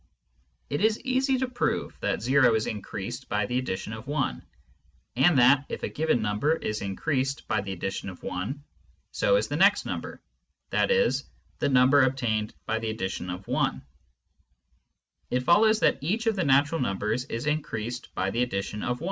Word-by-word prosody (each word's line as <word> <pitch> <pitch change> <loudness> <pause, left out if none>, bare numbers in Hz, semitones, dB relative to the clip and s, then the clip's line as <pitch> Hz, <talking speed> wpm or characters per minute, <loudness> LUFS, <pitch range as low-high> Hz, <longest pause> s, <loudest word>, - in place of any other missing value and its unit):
It 145 - -1
is 220 0 +3
easy 260 +1 +1
to 260 0 -1
prove 245 0 -2
that 115 - -2
o 130 -3 +5
is 110 - 0
incp^fased 110 +4 -5
by 105 -1 0
the 125 +4 -1
addition 110 -4 -4
of 115 +5 -8
i, 145 -3 0 0.8
and 140 +5 +4
that, 130 +3 +6
if - - -5
a - - -1
given 155 -6 0
numhef 110 +10 0
is 105 - -2
increased 135 +7 -2
by 110 -3 +1
the 100 -1 -6
addition 95 +1 -4
of 90 - -11
I, 95 +8 -3 0.6
so - - +2
is - - +1
the - - -2
next - - +4
nuipb^, - - -5 0.5
i.e. 485 0 +3 0.5
the - - +1
number 130 +2 +5
obtained 120 -5 0
by 110 - -1
the 115 0 -3
addition 95 -4 -4
of 90 +2 -6
i. - - 0 1.5
It 125 0 0
follows 215 - +4
that - - +3
each 205 +11 -1
of 225 -2 +2
the 185 -4 0
natural 140 +3 +3
numbers 105 +3 -1
is 115 -1 -4
increased 125 -5 -3
by 95 +1 0
the 120 - 0
addition 105 -3 -2
of 125 0 -1
i - - -17
125 Hz, 175 wpm, -27 LUFS, 105-150 Hz, 1.5 s, that